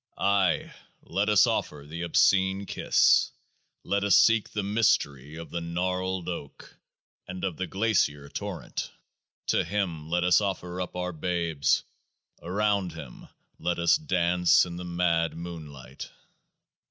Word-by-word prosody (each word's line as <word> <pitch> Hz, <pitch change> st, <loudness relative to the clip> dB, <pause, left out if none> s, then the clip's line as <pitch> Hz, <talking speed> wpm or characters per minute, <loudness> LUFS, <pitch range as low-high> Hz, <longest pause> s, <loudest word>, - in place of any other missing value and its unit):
Ay! 100 Hz, -2 st, +1 dB, 0.3 s
let 100 Hz, +2 st, -1 dB
us 105 Hz, -2 st, +6 dB
offer 70 Hz, -1 st, -2 dB
the 85 Hz, +3 st, -6 dB
Obscene 95 Hz, +3 st, +2 dB
Kiss! -, -, +3 dB, 0.5 s
Let 100 Hz, 0 st, 0 dB
us 100 Hz, -2 st, +5 dB
seek 115 Hz, -2 st, +4 dB
the 105 Hz, -, -3 dB
Mystery 75 Hz, -, 0 dB
of 85 Hz, 0 st, -9 dB
the 85 Hz, -, -3 dB
Gnarled 90 Hz, +1 st, -2 dB
Oak, 85 Hz, -5 st, -7 dB, 0.5 s
and 90 Hz, 0 st, -7 dB
of 95 Hz, -4 st, -1 dB
the 95 Hz, -, -3 dB
Glacier 95 Hz, -9 st, 0 dB
Torrent! -, -, -5 dB, 0.6 s
To -, -, +2 dB
Him 85 Hz, -7 st, -3 dB
let 90 Hz, +1 st, +1 dB
us 90 Hz, +3 st, +4 dB
offer 90 Hz, -2 st, -3 dB
up 90 Hz, -, -5 dB
our 90 Hz, 0 st, -2 dB
babes! 85 Hz, -3 st, 0 dB, 0.6 s
Around 100 Hz, -1 st, 0 dB
Him 75 Hz, -7 st, -10 dB, 0.3 s
let 90 Hz, -, -1 dB
us 85 Hz, -1 st, +4 dB
dance 90 Hz, -, +3 dB
in 85 Hz, -1 st, -7 dB
the 90 Hz, -, -6 dB
mad 85 Hz, -1 st, 0 dB
moonlight 80 Hz, -6 st, -9 dB
90 Hz, 135 wpm, -27 LUFS, 85-95 Hz, 0.6 s, us